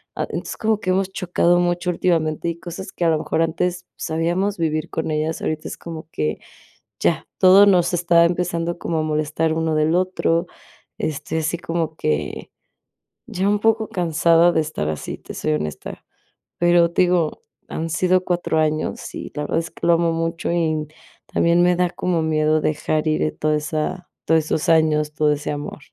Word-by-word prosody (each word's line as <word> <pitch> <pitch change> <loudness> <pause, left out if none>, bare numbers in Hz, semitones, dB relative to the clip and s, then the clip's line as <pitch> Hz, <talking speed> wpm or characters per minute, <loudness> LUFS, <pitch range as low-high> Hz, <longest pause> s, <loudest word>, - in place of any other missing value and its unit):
Ah, - - -2
entonces, - - -5
como 220 -1 +1
que 185 -4 -1
hemos 190 0 0
chocado 175 -1 +2
mucho 175 0 0
últimamente, 165 -2 0
y 170 0 -5
cosas 185 +2 -7
que 175 - -3
a - - +4
lo 160 - +3
mejor 165 - -1
antes 175 +2 -1
sabíamos 175 +5 -1
vivir 155 -1 -1
con 160 - -2
ellas, 155 +1 -1
ahorita 155 0 -3
es - - -6
como 160 -1 -8
que 75 0 -2 0.6
ya - - +1
todo 190 +2 +8
nos 180 -2 +3
está 170 -1 +4
empezando 170 -1 -1
como 165 -1 -2
a - - 0
molestar 155 +1 0
uno 160 -1 0
del 155 +2 +2
otro, 180 -2 +1 0.5
este, 155 +1 -3
así 160 +2 -1
como 165 -2 -3
que 75 - -2 0.8
ya 190 +2 -2
un 210 - +2
poco 220 -1 +2
cansada 170 0 +3
de 160 - +2
estar 150 - -3
así, 75 - -5
te - - -10
soy - - -1
honesta. 75 -1 -5 0.6
Pero, 175 -1 +4
te 180 - +3
digo, 175 -3 0 0.3
han 165 +1 -3
sido 185 +3 +2
4 175 -3 0
años 155 0 -2
y - - -7
la 150 - -2
verdad 165 - 0
es 165 - -6
que - - -4
lo 170 - +6
amo 170 0 +2
mucho, 165 +1 -2
y 155 -3 0 0.4
también 170 +1 +3
me 180 0 +4
da 180 0 +2
como 175 -2 -1
miedo 155 0 +2
dejar 155 +1 -1
ir 155 0 0
toda 155 0 +1
esa 155 +4 -3 0.2
todos 160 -1 +3
esos 155 - -1
años, 155 -2 +3
todo 150 -1 +2
ese 145 0 -4
amor. 145 +1 -5
165 Hz, 185 wpm, -21 LUFS, 155-175 Hz, 0.8 s, todo